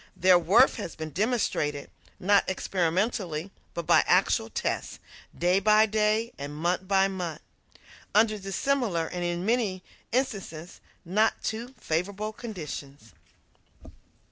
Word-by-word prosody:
Their 180 0 +6
worth 205 +10 +4
has - - -6
been 155 -1 -6
demonstrated, 180 - -1 0.3
not 200 +1 +3
experimentally, 185 -1 -1 0.2
but 170 - -4
by - - +5
actual - - +3
tests, - - -3 0.4
day 180 +2 +3
by 215 +2 +5
day 215 +2 +1
and 145 +1 -6
month 175 +4 -1
by 195 0 +4
month, 175 -5 -5 0.7
under 215 0 +4
dissimilar, 195 -2 0
and, 175 +2 -4
in 175 +1 -2
many 215 -5 0 0.3
instances, 195 -9 -3 0.2
not 210 +6 +1
too 235 +4 -4
favorable 200 +6 -2
conditions. 150 - -8
190 Hz, 115 wpm, -27 LUFS, 170-215 Hz, 0.7 s, Their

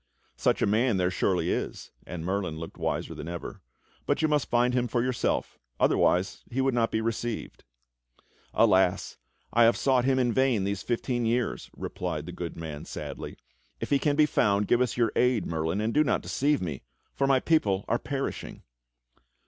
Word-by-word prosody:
"Such. - - +1
a - - +5
man 110 +1 +2
there 90 0 +1
surely 90 0 +1
is," - - -4 0.2
and 85 -2 -6
Merlin 95 -4 -2
looked 80 0 -8
wiser - - -2
than - - -7
ever, 85 0 -6 0.5
"but - - +1
you - - +5
must 150 -3 +1
find 125 +1 +3
him 125 -1 +1
for 120 +1 0
yourself, 125 -1 -1 0.2
otherwise 90 +2 +2
he 125 - -3
would 135 0 +2
not 115 -1 +2
be 110 - -1
received." 115 0 -3 0.9
"Alas! - - +3 0.4
I 120 0 +6
have 115 - +4
sought 130 -2 +2
him 135 -1 +3
in 125 -2 +2
vain 130 -6 +2
these 100 0 -2
fifteen 120 0 -1
years," 120 +1 -1
replied - - -4
the - - -6
good - - -6
man 80 -3 -6
sadly. - - -7 0.4
"If - - -5
he 140 - +4
can 145 -1 +1
be 155 0 +5
found, 105 -7 +2
give 120 - +3
us 125 -2 0
your 115 -2 +2
aid. 125 -3 +2
Merlin, 80 +3 -1
and 110 +2 -1
do 150 - +4
not 145 - 0
deceive 145 -4 +1
me, 80 -7 -4 0.3
for 135 - +1
my 135 -1 +4
people 105 -12 +1
are 115 - +1
perishing." 135 -2 -4
120 Hz, 185 wpm, -28 LUFS, 100-130 Hz, 0.9 s, I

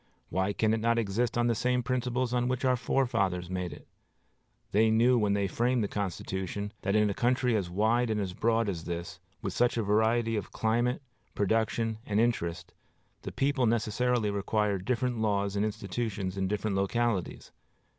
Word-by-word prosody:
Why 95 +3 +1
can 110 +1 +1
it 110 - +1
not 115 +1 +2
exist 115 +2 0
on 120 - +2
the 120 - +3
same 125 +2 0
principles 125 0 -1
on 125 0 +1
which 130 +1 -1
our 130 -1 +4
fathers 95 -8 0
made 90 -2 -3
it? 75 - -12 0.8
They 110 +2 +4
knew 115 +3 +4
when 105 -4 +2
they 100 -1 +1
framed 120 +3 +1
the - - 0
Constitution 100 +1 -4
that 100 0 0
in 105 0 +4
a 100 - 0
country 125 +1 +1
as 95 -5 -1
wide 110 +6 +2
and 100 -4 -2
broad 115 0 +2
as 85 -5 -3
this, 85 0 -5 0.2
with - - -2
such 120 0 +2
a 115 - +1
variety 110 +2 +2
of 105 -3 -4
climate, 120 +4 0 0.3
production, 110 +2 0
and 105 -2 0
interest, 90 -7 -1 0.5
the - - -6
people 135 -2 +1
necessarily 115 0 +1
required 100 -1 0
different 125 -1 0
laws 100 -2 0
and 100 - +1
institutions 105 -2 -3
in 95 -1 -1
different 105 0 -1
localities. 100 0 -1
110 Hz, 175 wpm, -29 LUFS, 100-120 Hz, 0.8 s, our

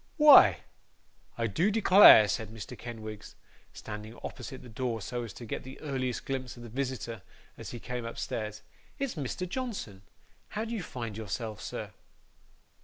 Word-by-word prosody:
'Why, 275 - +8 0.8
I 115 - 0
do 160 - +1
declare,' 200 - +8
said 110 0 -2
Mr. 110 -4 -8
Kenwigs, 110 -3 -8 0.4
standing 105 +2 -8
opposite 130 -2 -7
the - - -11
door 120 0 -3
so 120 +4 -4
as 115 -3 -6
to 120 - -9
get - - -4
the 130 +1 -10
earliest 130 -4 -3
glimpse 130 -2 -4
of 120 - -10
the 120 - -9
visitor, 125 -3 -4 0.3
as - - -8
he 120 - -7
came 125 +1 -5
upstairs, 110 -2 -5 0.3
'it's 275 -3 -2
Mr. 155 +4 -4
Johnson! 190 - -5 0.6
How 220 - -1
do 230 - -5
you 220 - -2
find 115 -9 -6
yourself, 110 0 -5
sir? - - -6
120 Hz, 160 wpm, -30 LUFS, 110-140 Hz, 0.8 s, Why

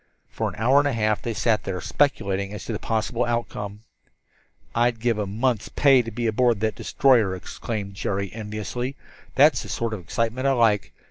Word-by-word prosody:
For - - -2
an - - -10
hour 130 +6 +4
and 145 - +2
a 140 - 0
half 110 -2 +1
they 115 -2 -3
sat 110 -1 +1
there, 95 -2 -3
speculating 100 - 0
as - - -8
to 115 - -4
the 105 - -3
possible 115 +2 -1
outcome. 105 -3 -3 0.9
"I'd 120 0 +1
give 115 -1 0
a 105 - -1
month's 115 +2 -1
pay 135 -3 +5
to 115 - -6
be 115 +1 -4
aboard 115 0 +2
that 110 -1 +1
destroyer," 115 -9 +2
exclaimed 100 +2 -5
Jerry 100 0 -3
enviously. 110 +4 -4 0.4
"That's - - +5
the - - -9
sort 115 -1 -2
of 110 - -4
excitement 115 +8 -1
I 135 - +4
like. 110 -5 +2
115 Hz, 190 wpm, -24 LUFS, 105-120 Hz, 0.9 s, pay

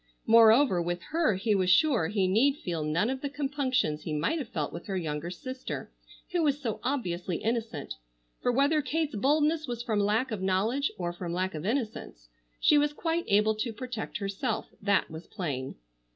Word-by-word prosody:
Moreover, 225 -2 +6
with 175 +1 -2
her 320 - +2
he 210 +3 +1
was 185 -2 +2
sure 205 - +4
he 195 -1 +1
need 260 +9 +3
feel 170 - -3
none 160 +7 +1
of 265 0 -4
the 285 - -2
compunctions 270 - -1
he 155 - -4
might 160 - 0
have 280 - -5
felt 150 -4 -3
with - - -8
her 195 -2 -2
younger 155 -1 -3
sister 255 +9 -6 0.4
who 355 -1 +1
was 290 -2 +2
so 230 -7 -3
obviously 185 -10 -2
innocent, 225 - -3 0.5
for 245 - +2
whether 285 +5 +3
Kate's 310 +1 -1
boldness 300 +6 +2
was 240 -1 -4
from 215 -3 0
lack 220 +5 +1
of 210 -3 -3
knowledge, 210 +9 +1
or 175 -1 -3
from 175 -1 -5
lack 185 +1 -1
of 155 +4 -4
innocence, 215 - -3 0.3
she 295 - +5
was 295 0 +1
quite 330 +2 -1
able 210 +2 +4
to 220 +2 -3
protect 240 0 -5
herself, 200 -1 -3
that 200 0 +2
was 160 +2 -9
plain. 140 - -4
220 Hz, 185 wpm, -29 LUFS, 180-275 Hz, 0.5 s, Moreover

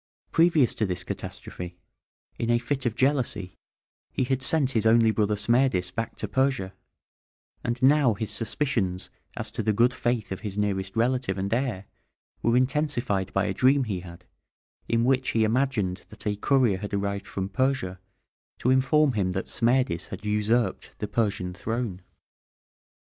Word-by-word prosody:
Previous 165 -6 +4
to 110 - -1
this 90 -1 -2
catastrophe, 95 -2 -7 0.6
in 115 - -1
a 120 - +4
fit 130 +2 -2
of 115 - -2
jealousy, 125 -8 0 0.6
he - - 0
had 130 +1 0
sent 135 -1 +2
his 110 -3 +2
only 115 0 +5
brother 105 -1 +1
Smerdis 105 -4 +2
back 115 +5 -4
to - - -4
Persia; 130 -8 0 0.9
and 120 +1 -2
now 135 -4 +5
his 105 +1 -4
suspicions 110 -6 -1 0.3
as - - -3
to - - -3
the 110 - +1
good 120 +4 +3
faith 120 -5 -1
of 95 - -3
his 105 -3 -5
nearest 95 -2 -1
relative 120 -3 +1
and 100 +2 -1
heir 115 -6 -1 0.6
were 115 +1 +3
intensified 130 -8 0
by 100 +1 +1
a - - -1
dream 135 +2 +4
he 100 -6 -3
had, 90 0 -12 0.6
in 115 0 +2
which 130 +1 +2
he 115 - +2
imagined 110 -6 0
that 110 - -13
a 105 -1 0
courier 115 -2 +2
had 105 0 -4
arrived 100 0 -2
from 95 -1 -3
Persia 130 -6 -1 0.6
to 125 - +1
inform 135 +3 +4
him 95 -4 0
that 95 - -3
Smerdis 120 -7 +1
had 95 +2 -8
usurped 105 +3 0
the 105 - -3
Persian 100 -4 -1
throne. 110 -2 -3
115 Hz, 160 wpm, -26 LUFS, 100-130 Hz, 0.9 s, only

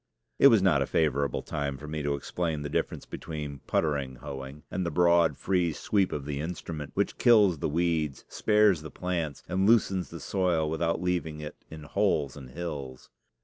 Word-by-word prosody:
It - - +9
was 115 -7 +5
not 80 -8 +4
a 70 - 0
favorable 70 -3 +1
time 70 -1 -3
for 75 - -9
me 75 0 -3
to 70 0 0
explain 80 +1 -3
the 75 - -5
difference - - -2
between 75 -3 -6
puttering 70 -5 0
hoeing 70 +2 -8
and 95 - -1
the 85 - -1
broad, 85 +1 +3
free 90 -4 +1
sweep 95 +4 +1
of 70 -2 -4
the 70 -1 -3
instrument 80 -2 -5
which - - -1
kills 105 -9 +5
the - - -1
weeds, 80 -3 0
spares 105 -6 +3
the 80 - -8
plants, 85 -5 -3
and 95 +3 +2
loosens 95 -5 +3
the 85 - -8
soil 90 -5 0
without 85 +2 0
leaving 85 -4 -1
it 75 -1 -9
in 80 -1 -9
holes 75 -5 0
and 65 -3 -10
hills. 70 -4 -6
80 Hz, 185 wpm, -28 LUFS, 75-90 Hz, -, It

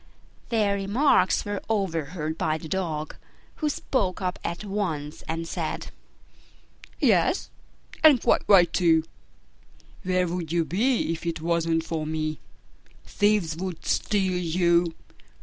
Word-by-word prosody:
Their 215 -4 +2
remarks 215 +10 +2
were 205 -1 -3
overheard 165 -6 -2
by 155 -1 0
the 160 - -9
Dog, 155 -4 -3 0.4
who 305 - 0
spoke 200 -10 -1
up 185 -2 -3
at 170 +5 -4
once 170 -8 -3
and 165 +1 -3
said, - - -4 1.1
"Yes, - - +2 0.5
and 300 -5 +8
quite - - +3
right, 180 -4 +6
too: 165 -3 +3 1.0
where 185 -1 +1
would 170 -2 -4
you 170 -1 +1
be 225 +3 +1
if 165 +1 -5
it 165 -1 -2
wasn't 165 0 0
for 160 -2 -3
me? 155 -1 -2 0.7
Thieves 205 -6 +1
would 185 -2 -5
steal 190 -3 +1
you! 170 -1 +2
175 Hz, 125 wpm, -26 LUFS, 160-200 Hz, 1.1 s, and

